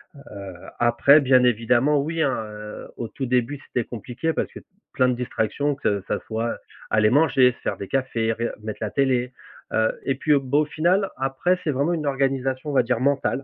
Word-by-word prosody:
Heu, 100 -8 -10 0.3
après 120 +5 +5
bien 130 -2 +4
évidemment, 125 +5 +3
oui, 160 +2 -1
hein, 135 - +1
heu, 105 0 -9
au 115 - -4
tout 135 +2 -5
début, 125 +3 0
c'était 120 -3 -2
compliqué 125 +7 -3
parce - - -2
que - - -9 0.3
plein 130 -1 +3
de 125 - +2
distractions 125 +3 -1
que 100 -8 -1
ça - - -1
soit 115 +1 -2 0.3
aller 105 0 +3
manger, 135 -3 +4
se 120 - -17
faire - - -3
des 100 - -6
cafés, 115 -4 0
reg 115 +1 -2
mettre 110 -1 -5
la 110 - -1
télé, 130 -2 +1 0.4
heu 110 0 +2
et 135 - +1
puis 150 +3 +1
au 140 - +4
bah, 135 +2 0
au 155 - +2
final, 175 +6 +1
après 135 +8 0
c'est 155 - -2
vraiment 140 +6 0
une 150 -3 -2
organisation 135 +1 -1
on - - -5
va 130 - +5
dire, 120 -1 -1
mentale, 140 0 0
130 Hz, 205 wpm, -23 LUFS, 120-140 Hz, 0.4 s, après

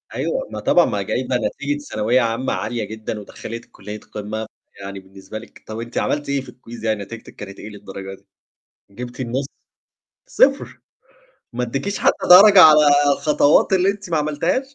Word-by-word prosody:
أيوه، - - -2
ما - - -5
طبعًا - - +4
ما - - -2
جايبة - - -2
نتيجة 295 -11 -3
ثانوية 125 - 0
عامة 115 +3 -1
عالية 120 -2 -3
جدًا، 110 +1 -6
ودخّلتك 115 +3 -9
كُلية 105 +2 -9
قمة، 110 +1 -6 0.3
يعني 100 0 -7
بالنسبة 95 +2 -11
لِك 115 - -16
طَب 110 +1 -6
أنتِ 120 +1 -7
عملتِ 145 -1 -1
إيه 140 -1 0
في 130 -1 -12
الquiz 120 -2 -12
يعني 110 -2 -1
نتيجتِك 115 +3 -11
كانت 100 -1 -10
إيه 105 - -8
للدرجة 100 -2 -9
دي؟ - - -26 0.7
جبتِ 120 +5 -8
النُصّ؟ 130 +2 -2 0.8
0! - - +1 0.7
ما 125 +1 -2
اديكيش 135 - -3
حتى - - +1
درجة 195 +1 +9
على 155 -1 +8 0.3
الخطوات 150 +4 +3
اللي 190 +1 +3
أنتِ 200 -2 -8
ما 165 - +1
عملتيهاش؟ 165 - -1
120 Hz, 165 wpm, -20 LUFS, 105-155 Hz, 0.8 s, درجة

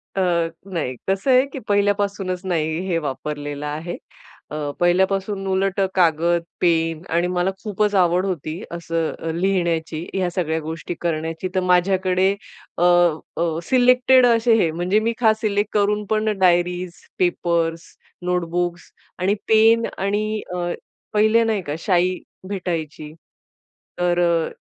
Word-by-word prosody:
अ, 190 - +1 0.5
नाही, 145 -7 -2
कसं 195 +8 +1
आहे, 255 +1 +5
की 270 -1 -7
पहिल्यापासूनच 200 -2 0
नाही 160 -3 -1
हे 170 - +1
वापरलेलं 145 +1 -5
आहे. 155 +4 -4 0.6
अ, 150 - -4 0.2
पहिल्यापासून 190 +3 +1
उलट 195 +1 0 0.2
कागद, 170 -1 +2 0.2
पेन 165 -2 +1
आणि 175 +1 +2
मला 180 +1 0
खूपच 210 0 0
आवड 180 0 +3
होती 170 -1 -4
असं 165 -1 -2
अ, 165 - -3
लिहिण्याची, 170 -3 -1
ह्या 185 -2 0
सगळ्या 160 -3 0
गोष्टी 160 +2 -5
करण्याची. 165 +1 -2
तर - - +3
माझ्याकडे 185 +1 +2 0.5
अ, 175 - +1 0.5
अ, 165 -1 0
सिलेक्टेड 250 +2 +5
असे 230 -1 +4
हे 165 - +1
म्हणजे 180 +6 +1
मी 230 +1 0
खास 220 -2 +3
सिलेक्ट 205 -1 0
करून 210 0 +1
पण 215 -1 0
डायरीज, 180 0 +2 0.3
पेपर्स, 170 -2 0 0.4
नोटबुक्स 175 0 -2 0.3
आणि 190 +3 +2
पेन. 225 +1 +5
आणि 210 +2 -1
अ, 175 -1 -2 0.4
पहिले 220 +2 +4
नाही 220 -3 0
का 145 - -2
शाई 180 0 +1 0.3
भेटायची, 165 -6 -4 0.9
तर 175 0 +1
अ, 170 -2 +2
180 Hz, 130 wpm, -21 LUFS, 165-205 Hz, 0.9 s, आहे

